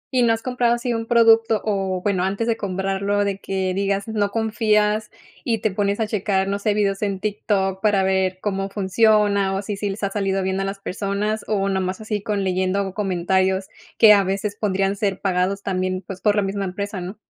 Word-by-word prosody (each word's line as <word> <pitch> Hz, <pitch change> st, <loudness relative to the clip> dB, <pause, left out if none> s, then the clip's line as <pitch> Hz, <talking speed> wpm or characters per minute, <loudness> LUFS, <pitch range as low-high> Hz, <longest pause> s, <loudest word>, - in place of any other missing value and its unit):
¿Y 250 Hz, -, +4 dB
no 235 Hz, -1 st, +4 dB
has 225 Hz, 0 st, -1 dB
comprado 245 Hz, -2 st, +1 dB
así 240 Hz, 0 st, -2 dB
un 225 Hz, 0 st, -3 dB
producto, 225 Hz, -1 st, +5 dB
o 195 Hz, -3 st, -1 dB
bueno, 195 Hz, -3 st, +1 dB
antes 195 Hz, +4 st, -1 dB
de 230 Hz, -, +2 dB
comprarlo 195 Hz, 0 st, -1 dB
de 200 Hz, -1 st, -2 dB
que 190 Hz, -1 st, -2 dB
digas 195 Hz, +1 st, -1 dB
no 210 Hz, -2 st, 0 dB
confías 215 Hz, -1 st, +1 dB, 0.3 s
y 230 Hz, -2 st, 0 dB
te 215 Hz, 0 st, -1 dB
pones 200 Hz, +1 st, -1 dB
a 220 Hz, -, +1 dB
checar, 195 Hz, -2 st, 0 dB
no 200 Hz, +1 st, -1 dB
sé, 205 Hz, 0 st, 0 dB
vídeos 200 Hz, -2 st, 0 dB
en 200 Hz, -2 st, -1 dB
TikTok 195 Hz, -2 st, -1 dB
para 205 Hz, -3 st, +3 dB
ver 190 Hz, -1 st, +1 dB
cómo 195 Hz, -1 st, -2 dB
funciona, 200 Hz, 0 st, +2 dB
o 195 Hz, -, -3 dB
si 205 Hz, 0 st, -4 dB
sí 200 Hz, +1 st, -3 dB
les 195 Hz, +2 st, -6 dB
ha 200 Hz, -, 0 dB
salido 195 Hz, -1 st, -1 dB
bien 190 Hz, 0 st, -1 dB
a -, -, -1 dB
las 195 Hz, +1 st, -4 dB
personas 200 Hz, +2 st, -2 dB
o 200 Hz, -2 st, 0 dB
nomás 190 Hz, -1 st, -1 dB
así 215 Hz, -1 st, -3 dB
con 205 Hz, -1 st, -2 dB
leyendo 190 Hz, +1 st, 0 dB
comentarios 190 Hz, -1 st, 0 dB, 0.3 s
que 215 Hz, -2 st, +8 dB
a 200 Hz, -1 st, +4 dB
veces 195 Hz, +2 st, -2 dB
pondrían 195 Hz, -2 st, 0 dB
ser 200 Hz, -2 st, -1 dB
pagados 190 Hz, +1 st, 0 dB
también, 185 Hz, -1 st, -2 dB
pues, 190 Hz, 0 st, -8 dB
por 210 Hz, 0 st, +3 dB
la 205 Hz, -, +2 dB
misma 195 Hz, 0 st, -2 dB
empresa, 200 Hz, +1 st, -4 dB
no? 185 Hz, +4 st, -7 dB
200 Hz, 210 wpm, -22 LUFS, 190-210 Hz, 0.3 s, que